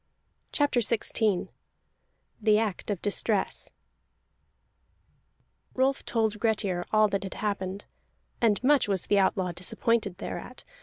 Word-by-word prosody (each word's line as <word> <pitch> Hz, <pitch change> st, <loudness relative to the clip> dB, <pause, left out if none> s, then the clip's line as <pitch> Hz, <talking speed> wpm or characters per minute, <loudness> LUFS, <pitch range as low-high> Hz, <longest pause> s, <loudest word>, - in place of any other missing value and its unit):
CHAPTER 290 Hz, -4 st, +2 dB
XVI 220 Hz, -3 st, +1 dB, 0.9 s
THE 210 Hz, 0 st, +4 dB
ACT 215 Hz, -3 st, -2 dB
OF 200 Hz, -4 st, -3 dB
DISTRESS 205 Hz, 0 st, 0 dB, 2.1 s
Rolf 265 Hz, +1 st, +1 dB
told 220 Hz, -2 st, 0 dB
Grettir 205 Hz, -5 st, 0 dB
all 215 Hz, 0 st, +5 dB
that 200 Hz, 0 st, -1 dB
had 195 Hz, -1 st, -6 dB
happened, 200 Hz, -2 st, -3 dB, 0.6 s
and 225 Hz, -1 st, +2 dB
much 280 Hz, -1 st, +4 dB
was 195 Hz, -3 st, -1 dB
the 205 Hz, -, +3 dB
outlaw 190 Hz, -1 st, +1 dB
disappointed 195 Hz, +3 st, 0 dB
thereat. -, -, -7 dB
210 Hz, 110 wpm, -28 LUFS, 195-225 Hz, 2.1 s, all